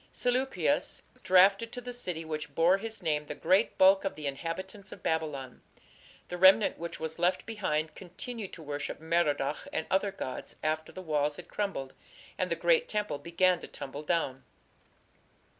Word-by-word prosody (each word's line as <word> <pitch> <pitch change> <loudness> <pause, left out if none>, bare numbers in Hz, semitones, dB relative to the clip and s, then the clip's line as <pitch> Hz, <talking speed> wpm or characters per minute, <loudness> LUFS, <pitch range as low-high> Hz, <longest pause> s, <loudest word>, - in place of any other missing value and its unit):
" - - -33
Seleucus 255 +2 0 0.2
drafted 195 +5 +5
to 245 - -6
the 245 0 -6
city 180 -9 -4
which 150 -2 -5
bore 175 +4 +4
his 220 -2 -5
name 150 -2 0
the 150 - -5
great 190 +9 +2
bulk 190 +1 +6
of 195 - -2
the 155 - -7
inhabitants 190 +8 -5
of - - -11
Babylon. 150 -6 -2 0.7
The 180 - -5
remnant 190 +3 +6
which 170 0 -5
was 160 +1 -4
left 175 +2 +2
behind 160 -8 -1
continued 205 +5 -7
to 165 - -9
worship 145 0 -4
Merodach 155 -3 0
and 160 - -2
other 195 +1 +2
gods 130 -9 -6
after 155 0 -1
the 185 - -8
walls 150 -2 +1
had - - -10
crumbled 195 -10 -3 0.4
and - - -1
the - - +1
great 485 -1 +3
temple 210 -8 -2
began 175 +4 +2
to - - -9
tumble 140 +2 -7
down. 150 -5 -1
170 Hz, 170 wpm, -30 LUFS, 150-195 Hz, 0.7 s, bulk